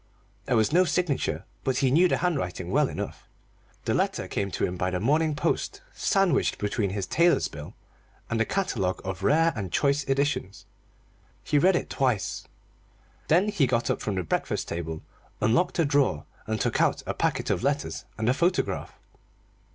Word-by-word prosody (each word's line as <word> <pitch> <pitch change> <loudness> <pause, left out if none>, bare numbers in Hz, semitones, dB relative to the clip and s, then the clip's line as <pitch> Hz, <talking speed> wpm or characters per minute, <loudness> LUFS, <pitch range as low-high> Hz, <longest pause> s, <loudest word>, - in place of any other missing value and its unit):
There 125 - +1
was 110 +5 +2
no 180 +2 +6
signature, 175 -5 -1 0.2
but 130 -1 0
he 130 -2 +2
knew 170 +6 +5
the - - +1
handwriting 95 - -2
well - - +3
enough. - - -6 0.6
The - - +1
letter - - 0
came 100 -1 -2
to - - -1
him 90 - -3
by 90 +1 -1
the 90 -1 -2
morning 150 - +2
post, 150 - -1
sandwiched 195 -8 +2
between 105 0 -1
his 95 0 -3
tailor's 170 - +3
bill 75 -1 -10 0.5
and 115 -1 -1
a - - +5
catalogue 125 - -1
of 95 0 -4
Rare 165 +9 +3
and 95 -5 -4
Choice 140 0 +2
Editions. 135 -7 -1 0.8
He 145 - +2
read 185 +4 +4
it - - -2
twice. 125 -9 -1 0.8
Then 180 +7 +4
he 175 -10 +2
got 120 -1 +1
up - - -2
from 105 - -2
the 95 - -1
breakfast 80 - -2
table, 80 -2 -4 0.4
unlocked 130 +12 +2
a 165 - +3
drawer, 140 - +1 0.2
and 110 0 -1
took - - +1
out - - +1
a - - -2
packet - - -1
of - - 0
letters 140 +2 -1
and 110 0 -1
a 125 - +4
photograph. 175 +6 -1
130 Hz, 175 wpm, -26 LUFS, 100-160 Hz, 0.8 s, no